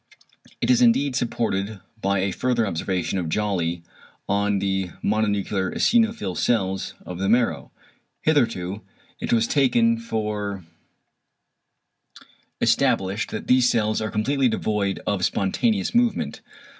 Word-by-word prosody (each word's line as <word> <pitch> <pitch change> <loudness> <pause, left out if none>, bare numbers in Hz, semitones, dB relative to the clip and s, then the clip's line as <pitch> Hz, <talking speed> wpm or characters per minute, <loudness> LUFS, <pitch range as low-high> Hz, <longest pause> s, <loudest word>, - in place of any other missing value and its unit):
It - - +3
is 250 0 +4
indeed 145 - +3
supported 110 -4 -1 0.2
by 100 0 +1
a 95 0 0
further 120 0 0
observation 95 +1 -2
of 85 -3 -3
Jolly 85 -4 -1 0.4
on 100 0 +1
the 95 -1 -1
mononuclear 100 -2 0
eosinophil 225 - +2
cells 95 -4 0
of 90 -1 -7
the 95 +1 0
marrow. 110 - +1 0.5
Hitherto 115 - +1 0.4
it - - -3
was 115 -1 +3
taken 230 - +3
for 105 - -3 1.9
established 95 +3 +1
that 110 - -5
these 125 -1 +4
cells 110 -2 +1
are 110 - -2
completely 130 +6 +1
devoid 105 -3 -1
of 100 -3 -1
spontaneous 200 - 0
movement. 240 0 +1
105 Hz, 120 wpm, -23 LUFS, 95-125 Hz, 1.9 s, is